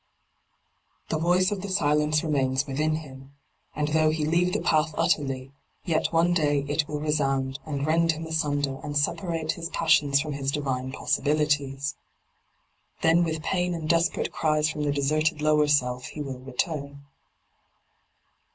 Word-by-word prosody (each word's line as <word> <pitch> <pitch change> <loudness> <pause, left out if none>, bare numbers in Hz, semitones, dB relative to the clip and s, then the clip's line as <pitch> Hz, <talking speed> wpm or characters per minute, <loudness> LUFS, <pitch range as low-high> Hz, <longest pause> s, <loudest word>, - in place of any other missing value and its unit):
The 155 - 0
voice 180 +4 +2
of 200 -2 -3
the 200 - -5
silence 150 -4 +2
remains 135 -3 +1
within 150 +3 0
him, 135 -3 -10 0.4
and 150 0 -1
though 155 0 +3
he 155 -1 -1
leave 175 +3 +2
the - - 0
path 155 0 +1
utterly, 135 -6 0 0.3
yet 160 -3 0
one 170 +1 +3
day 145 -4 +1
it 150 +1 0
will 150 -1 -4
resound 135 -3 0
and 140 -2 -2
rend 165 +1 +3
him 160 +1 -6
asunder 145 -4 -1
and 145 -1 -2
separate 165 +1 -1
his 165 0 -5
passions 145 -5 +3
from 150 0 -3
his 140 -1 -2
divine 130 -3 -2
possibilities. 145 -1 0 1.1
Then 165 +2 +4
with 160 -2 -3
pain 180 -1 0
and 160 -2 -5
desperate 170 +2 +1
cries 155 0 +1
from 150 - -5
the 145 - +1
deserted 155 +3 +1
lower 150 0 +3
self 125 -4 +1
he 150 - -7
will 135 -2 -6
return. 140 +2 -4
150 Hz, 150 wpm, -26 LUFS, 140-160 Hz, 1.1 s, Then